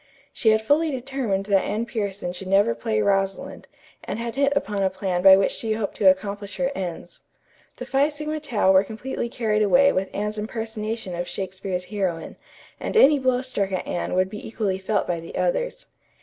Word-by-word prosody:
She 225 - +2
had 220 0 +3
fully 305 +7 +3
determined 255 -7 -2
that 195 -2 +3
Anne 215 +3 -2
Pierson 200 -6 -3
should 185 +1 -7
never 195 -9 +4
play 115 -2 -1
Rosalind, 195 -1 -1 0.4
and - - -4
had 235 0 -4
hit 280 0 +2
upon 210 -8 -1
a 190 - +3
plan 190 -1 -2
by 190 0 +9
which 195 - +2
she 220 -1 -2
hoped 215 -2 -3
to 195 - +6
accomplish 200 +1 -2
her 270 0 0
ends. 180 -8 -6 0.5
The - - -7
Phi 275 +2 +2
Sigma 305 +1 -4
Tau 235 -10 +2
were 190 0 +6
completely 235 +3 -5
carried 220 -3 0
away 270 +7 +5
with 190 +1 -1
Anne's 210 +1 -3
impersonation 220 -2 -4
of 175 +1 -3
Shakespeare's 185 0 -4
heroine, 185 -4 -3 0.4
and - - -2
any 295 -7 +7
blow 255 -1 +1
struck 200 -7 -2
at 185 - -2
Anne 175 - -2
would 185 +1 +1
be 210 - -7
equally 205 -4 -2
felt 200 +1 0
by 175 -2 -2
the 165 - -10
others. - - -1
210 Hz, 190 wpm, -24 LUFS, 190-245 Hz, 0.5 s, by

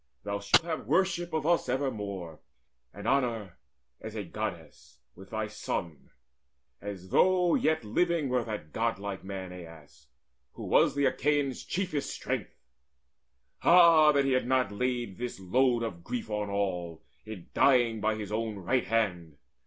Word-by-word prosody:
Thou 100 0 -3
shalt 100 +10 +4
have 165 -2 -4
worship 175 -2 +1
of 160 -2 -2
us 170 -5 +2
evermore 105 - -3 0.5
And 100 +2 -8
honour 115 -8 0 0.4
as - - -8
a - - -3
Goddess, - - -7 0.2
with 95 +2 -14
thy 110 -1 -2
son, 85 -6 -5 0.7
As 95 -2 -7
though 180 - +4
yet 155 -4 +1
living 165 +7 +1
were 125 -1 +1
that 105 -10 -6
godlike 100 -4 -2
man, 95 -1 -6
Aias, 80 -4 -13 0.5
who - - -9
was - - +3
the 140 0 +2
Achaeans' 145 0 0
chiefest 180 -7 -2
strength. - - -5 1.0
Ah 170 -3 +7
that 140 -1 +2
he 135 - +1
had 130 -2 +1
not 130 -5 +2
laid 120 -2 -2
this 125 -4 -5
load 120 +5 +2
of 85 -7 -5
grief 115 0 -5
On 105 -1 -2
all, 90 -5 -3 0.2
in 105 -5 -10
dying 120 -5 +3
by 110 +1 +1
his 105 -1 -6
own 110 0 -2
right 100 +7 0
hand! 90 -9 -1
115 Hz, 150 wpm, -29 LUFS, 100-135 Hz, 1.0 s, Ah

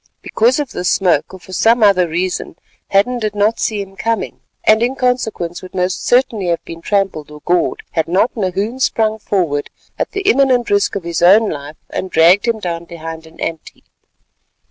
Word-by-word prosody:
Because 240 +5 +2
of 290 -3 -3
this 180 - -1
smoke, 175 -6 +2
or 190 - -10
for 185 - -13
some 225 +5 +3
other 190 -4 +4
reason, 175 +1 -3 0.3
Hadden 240 +6 +2
did 215 -2 -3
not 210 +2 +1
see 210 -2 -1
him 195 0 -15
coming, 225 +1 -2 0.2
and 220 +1 +4
in 245 +3 +1
consequence 225 -9 -1
would 185 - -12
most 180 0 -1
certainly 245 -6 +2
have 170 -1 -1
been 165 0 -9
trampled 195 -6 -1
or 150 0 -12
gored, 175 +1 0
had 160 -1 -1
not 190 +7 +2
Nahoon 205 +4 -2
sprung 220 -4 +1
forward, 170 -9 -1 0.3
at - - -2
the 395 - -2
imminent 270 - +2
risk 200 0 +2
of 195 - -3
his 170 -1 -3
own 205 +5 +5
life, 145 +1 -7
and 190 - -3
dragged 175 +7 +4
him 230 -1 +1
down 170 -3 -4
behind 165 -1 -8
an 160 - -18
ant 165 -1 -3
heap. - - -29
195 Hz, 190 wpm, -17 LUFS, 170-225 Hz, 0.3 s, own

